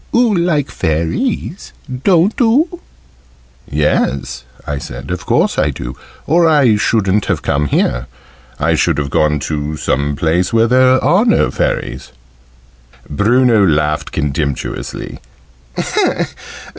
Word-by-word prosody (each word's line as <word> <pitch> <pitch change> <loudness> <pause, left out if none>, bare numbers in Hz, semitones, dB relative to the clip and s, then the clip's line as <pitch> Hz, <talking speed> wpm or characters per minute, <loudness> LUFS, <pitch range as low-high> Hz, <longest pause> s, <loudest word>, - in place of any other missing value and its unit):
"Oo 240 -2 +3
like 170 -6 0
Fairies, 85 - -2 0.3
don't 185 +2 +3
oo?" 300 +10 +2 0.9
"Yes," 65 -3 -1 0.2
I 70 -1 -3
said: 60 +3 -8
"of 90 - -5
course - - +1
I - - +2
do, - - -6 0.3
or 165 +2 +3
I 140 -8 +4
shouldn't 105 -2 +1
have - - -2
come 75 +1 0
here. 65 -1 0 0.5
I - - +1
should - - +1
have 70 -2 -2
gone 75 -1 +2
to 75 0 -3
some 70 +1 -1
place 85 +3 0
where 115 0 +3
there 130 +2 +3
are 190 +5 +4
no 225 - +2
Fairies." - - -3 1.0
Bruno 115 - +3
laughed 75 -3 0
contemptuously. 75 -2 -3
90 Hz, 120 wpm, -15 LUFS, -, 1.0 s, I